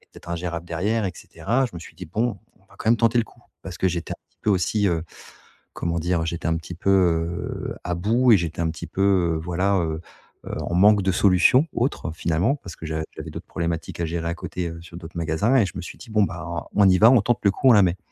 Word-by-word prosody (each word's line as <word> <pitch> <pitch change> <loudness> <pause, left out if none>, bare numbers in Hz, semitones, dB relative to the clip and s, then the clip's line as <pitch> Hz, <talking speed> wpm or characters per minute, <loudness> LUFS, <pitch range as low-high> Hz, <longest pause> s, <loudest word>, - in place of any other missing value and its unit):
peut - - -29
être - - -13
ingérable 85 0 -4
derrière, 100 +7 -1
et 95 - -2
cetera. 120 +6 -1
Je - - -11
me - - -5
suis 85 - -12
dit: 90 - -9
«Bon, 110 +4 -1 0.2
on - - -29
va - - -20
quand 110 - 0
même 120 - +5
tenter 115 +1 +2
le 115 - +2
coup». 120 - -21 0.2
Parce 90 -2 -8
que 95 - +1
j'étais 85 -1 -3
un - - -10 0.2
peu 105 - +2
aussi, 100 +2 +2
heu, 80 -1 -1 0.7
comment 85 0 -2
dire? 85 0 0
J'étais 80 0 -3
un 80 - +1
petit 85 +2 -7
peu 95 +3 -1 0.8
heu - - -5
à 90 - -1
bout 115 +8 +3
et 100 - +7
j'étais 85 0 -4
un 80 - 0
petit 85 +1 -7
peu, 95 +5 -3 0.3
heu, - - -3
voilà, 90 +3 0
heu 80 -2 -2 0.5
heu, - - -4
en 85 - -3
manque 100 +2 +5
de 95 - +1
solution, 100 - +4
autre, 115 - -2
finalement, 85 - 0
parce 90 -11 -11
que 80 - -8
j'a 80 0 -2
j'avais - - -7
d'autres - - -8
problématiques 85 -1 -4
à 85 - +1
gérer 85 0 -3
à 85 - -1
côté, 90 0 -4
heu, 85 0 -8
sur 85 0 -12
d'autres 85 -1 -10
magasins 85 +10 +1
et 115 - +4
je 90 - -7
me - - -4
suis - - -9
dit: - - -12
«Bon, 105 -1 +3
ben 85 -2 -5
on 100 -2 +5
y 90 0 +4
va, 110 +3 +8
on 125 -4 +6
tente 120 +2 +1
le 100 - +4
coup, 130 +7 +2
on - - +9
la 105 -3 +6
met». 90 0 +2
90 Hz, 265 wpm, -23 LUFS, 85-105 Hz, 0.8 s, on